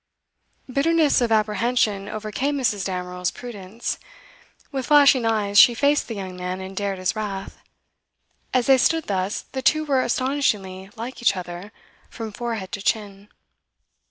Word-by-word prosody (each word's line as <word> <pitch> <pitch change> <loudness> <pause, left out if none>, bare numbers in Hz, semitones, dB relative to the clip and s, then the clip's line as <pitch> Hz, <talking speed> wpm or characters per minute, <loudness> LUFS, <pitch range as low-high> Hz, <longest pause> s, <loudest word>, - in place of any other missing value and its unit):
Bitterness 295 +2 +2
of 235 -2 +1
apprehension 215 -1 +1
overcame 220 +7 -2
Mrs. 215 -7 0
Damerel's 180 -1 -2
prudence. 225 -2 -6 0.7
With 265 -3 -3
flashing 280 -5 +6
eyes, 205 -2 +3
she 240 - +8
faced 285 +3 +2
the 230 - -5
young 190 -2 -6
man 180 +1 -4
and 190 0 -8
dared 200 -1 -2
his 185 +3 -1
wrath. 200 -3 -5 0.9
As 255 -2 +2
they 265 -1 +5
stood 325 +5 +2
thus, 190 0 -2
the 265 - -3
two 310 +3 +3
were 275 -3 +2
astonishingly 215 -8 -1
like 240 +3 -7
each 215 -5 +3
other, 180 +3 -7 0.4
from 225 -2 -6
forehead 225 -3 -4
to 200 - -5
chin. 205 -1 -2
215 Hz, 145 wpm, -23 LUFS, 195-255 Hz, 0.9 s, she